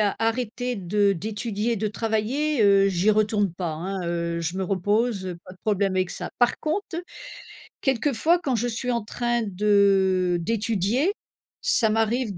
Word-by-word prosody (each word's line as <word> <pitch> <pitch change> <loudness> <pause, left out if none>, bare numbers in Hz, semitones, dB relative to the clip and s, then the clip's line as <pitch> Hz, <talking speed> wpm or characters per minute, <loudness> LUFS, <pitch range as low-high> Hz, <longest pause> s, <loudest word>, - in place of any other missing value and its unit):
a 205 -2 +2
arrêté 240 +2 -1
de 200 +2 +1
d'étudier 215 +4 -2
de 215 +1 -1
travailler, 225 +6 0
heu, 195 -1 +5
j'y 195 +3 +2
retourne 210 -3 +1
pas, 170 -2 -3
hein, 185 +5 -4
heu, 170 0 -2
je 165 +2 -3
me 190 - -1
repose, 205 +2 0
heu, 180 -2 -5
pas - - -12
de 185 - -16
problème 200 -3 +1
avec 185 -1 0
ça. - - -5
Par 245 -1 +2
conte, 325 +3 -2 0.9
quelquefois 275 +5 +2
quand 270 -7 -1
je 240 +2 0
suis 245 +2 -2
en 235 -3 -1
train 240 +2 -1
de 195 -3 +2
d'étudier 230 - 0 0.5
ça 375 - +3
m'arrive 225 -1 0
210 Hz, 160 wpm, -24 LUFS, 190-235 Hz, 0.9 s, heu